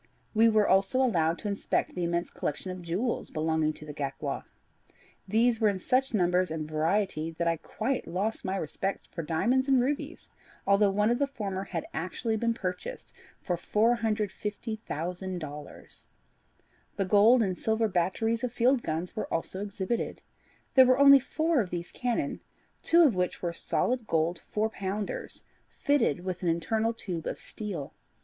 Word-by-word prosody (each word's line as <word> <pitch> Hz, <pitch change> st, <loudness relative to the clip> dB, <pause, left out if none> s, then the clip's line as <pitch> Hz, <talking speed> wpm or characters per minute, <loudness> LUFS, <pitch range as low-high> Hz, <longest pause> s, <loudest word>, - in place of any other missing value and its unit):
We 225 Hz, +1 st, +5 dB
were 215 Hz, -2 st, +3 dB
also 195 Hz, +6 st, +3 dB
allowed 170 Hz, -10 st, +2 dB
to -, -, -5 dB
inspect 200 Hz, -1 st, -1 dB
the 180 Hz, -, -3 dB
immense 170 Hz, 0 st, -1 dB
collection 185 Hz, +5 st, -3 dB
of 185 Hz, 0 st, -7 dB
jewels 185 Hz, +8 st, -2 dB
belonging 155 Hz, 0 st, 0 dB
to 155 Hz, -, -12 dB
the 150 Hz, -, -7 dB
Gaekwar. 140 Hz, -2 st, -4 dB, 0.8 s
These 225 Hz, +3 st, +2 dB
were 215 Hz, -, +5 dB
in 200 Hz, -, -1 dB
such 260 Hz, +8 st, +1 dB
numbers 180 Hz, -1 st, +2 dB
and 155 Hz, -1 st, -4 dB
variety 160 Hz, +1 st, 0 dB
that 170 Hz, +1 st, -2 dB
I 165 Hz, 0 st, +2 dB
quite 255 Hz, -, -3 dB
lost 195 Hz, +6 st, -2 dB
my 190 Hz, -, -1 dB
respect 190 Hz, +4 st, -3 dB
for 170 Hz, -, -4 dB
diamonds 220 Hz, -, +1 dB
and 265 Hz, -2 st, +5 dB
rubies, 275 Hz, +4 st, -2 dB, 0.3 s
although 200 Hz, +1 st, +4 dB
one 210 Hz, +3 st, +2 dB
of 240 Hz, -, +1 dB
the 280 Hz, -, +2 dB
former 200 Hz, -7 st, -4 dB
had 170 Hz, -5 st, -4 dB
actually 185 Hz, +7 st, -2 dB
been 230 Hz, +1 st, 0 dB
purchased 230 Hz, -, -5 dB, 0.3 s
for 180 Hz, -, 0 dB
$450,000. 205 Hz, -, -2 dB, 0.9 s
The 195 Hz, -, 0 dB
gold 215 Hz, +5 st, +6 dB
and 185 Hz, -3 st, -1 dB
silver 220 Hz, +3 st, +1 dB
batteries 215 Hz, +6 st, 0 dB
of 250 Hz, -, -1 dB
field 245 Hz, +2 st, +3 dB
guns 165 Hz, +1 st, -3 dB
were -, -, -4 dB
also 185 Hz, +3 st, -2 dB
exhibited. 205 Hz, +3 st, -3 dB, 0.5 s
There 260 Hz, -1 st, +8 dB
are 255 Hz, 0 st, +5 dB
only 280 Hz, 0 st, +9 dB
four 310 Hz, +2 st, +1 dB
of 190 Hz, -, -4 dB
these 175 Hz, -1 st, -5 dB
cannon, 250 Hz, +4 st, -2 dB, 0.4 s
two 340 Hz, +1 st, +5 dB
of 285 Hz, -7 st, +5 dB
which 180 Hz, -1 st, -2 dB
are 170 Hz, -1 st, -1 dB
solid 245 Hz, +6 st, -1 dB
gold 165 Hz, +2 st, +1 dB
four 215 Hz, +1 st, 0 dB
pounders, 200 Hz, 0 st, -4 dB, 0.2 s
fitted 275 Hz, -, +1 dB
with 185 Hz, -1 st, -4 dB
an 175 Hz, -, +1 dB
internal 220 Hz, +8 st, +1 dB
tube 180 Hz, -7 st, -5 dB
of -, -, -3 dB
steel. 195 Hz, -10 st, -6 dB
200 Hz, 160 wpm, -29 LUFS, 170-230 Hz, 0.9 s, only